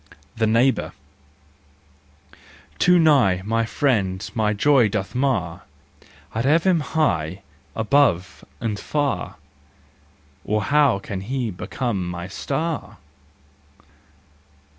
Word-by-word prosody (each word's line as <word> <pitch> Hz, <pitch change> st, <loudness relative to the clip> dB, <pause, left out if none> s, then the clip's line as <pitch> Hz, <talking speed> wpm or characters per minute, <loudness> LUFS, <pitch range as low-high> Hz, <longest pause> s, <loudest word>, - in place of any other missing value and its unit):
The 110 Hz, -1 st, +1 dB
Neighbour. 120 Hz, +4 st, +2 dB, 1.9 s
Too 180 Hz, 0 st, +5 dB
nigh, 135 Hz, -, +4 dB
my 115 Hz, +1 st, 0 dB
friend 105 Hz, -9 st, 0 dB
my 110 Hz, -2 st, +1 dB
joy 125 Hz, +2 st, +4 dB
doth 100 Hz, -1 st, -3 dB
mar, 125 Hz, -11 st, -1 dB, 0.7 s
I'd 115 Hz, -, -1 dB
have 155 Hz, +5 st, +3 dB
him 185 Hz, -3 st, +3 dB
high 100 Hz, -, -1 dB, 0.3 s
above 105 Hz, -7 st, +1 dB, 0.2 s
and 110 Hz, -3 st, -3 dB
far, 145 Hz, +4 st, -2 dB, 1.1 s
Or 105 Hz, +1 st, -1 dB
how 140 Hz, -5 st, +3 dB
can 100 Hz, -1 st, -6 dB
he 120 Hz, +2 st, -3 dB
become 95 Hz, +1 st, -3 dB
my 90 Hz, 0 st, -6 dB
star 150 Hz, -, -4 dB
115 Hz, 95 wpm, -22 LUFS, 95-140 Hz, 1.9 s, Too